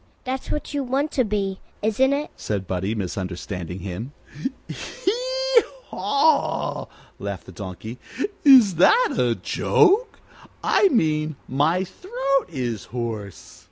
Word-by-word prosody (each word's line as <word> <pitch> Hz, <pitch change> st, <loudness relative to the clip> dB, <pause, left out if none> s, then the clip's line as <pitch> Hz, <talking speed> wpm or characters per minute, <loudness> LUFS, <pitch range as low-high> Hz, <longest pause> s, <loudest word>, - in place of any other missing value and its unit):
"That's 260 Hz, 0 st, -4 dB
what 300 Hz, -, -3 dB
you 285 Hz, -1 st, 0 dB
want 275 Hz, +4 st, 0 dB
to 255 Hz, -, +2 dB
be, 200 Hz, -3 st, -1 dB, 0.2 s
isn't 225 Hz, +5 st, +3 dB
it?" 290 Hz, +2 st, -1 dB
said 100 Hz, -3 st, -3 dB
Buddie, 95 Hz, +4 st, -2 dB
misunderstanding 90 Hz, -2 st, -4 dB
him. 100 Hz, +9 st, -6 dB, 0.5 s
"Hee -, -, 0 dB, 0.3 s
haw!" 285 Hz, +1 st, +1 dB, 0.3 s
laughed 100 Hz, -2 st, -5 dB
the -, -, -11 dB
Donkey. 100 Hz, +6 st, -7 dB, 0.4 s
"Is 245 Hz, -, +7 dB
that 455 Hz, -, +5 dB
a -, -, +2 dB
joke? 435 Hz, +6 st, +2 dB, 0.5 s
I 405 Hz, -, +4 dB
mean 155 Hz, -, +1 dB
my 155 Hz, +8 st, +2 dB
throat 275 Hz, -, -1 dB
is 125 Hz, -, -3 dB
hoarse." 115 Hz, -5 st, -6 dB
190 Hz, 120 wpm, -23 LUFS, -, 0.5 s, Is